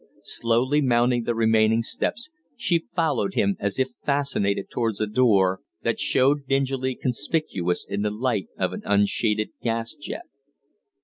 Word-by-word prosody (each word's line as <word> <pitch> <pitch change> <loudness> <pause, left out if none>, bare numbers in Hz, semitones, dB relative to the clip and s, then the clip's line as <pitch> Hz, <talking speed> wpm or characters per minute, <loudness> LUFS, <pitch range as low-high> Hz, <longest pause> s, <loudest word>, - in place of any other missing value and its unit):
Slowly 125 +6 +1
mounting 120 -2 +2
the 120 - 0
remaining 110 0 +3
steps, 240 - -3 0.3
she 170 -8 +1
followed 140 - 0
him 100 -1 +2
as 100 0 -2
if 130 0 +1
fascinated 140 -9 0
towards 115 -4 -1
the 110 - 0
door 105 -5 +3 0.2
that - - 0
showed 140 +2 +2
dingily 135 -1 0
conspicuous 120 - -1
in 100 - -2
the 105 - +1
light 110 -3 -1
of - - -1
an - - -5
unshaded 105 +1 +1
gas 115 +1 -2
jet. 155 - -7
120 Hz, 140 wpm, -24 LUFS, 105-135 Hz, 0.3 s, remaining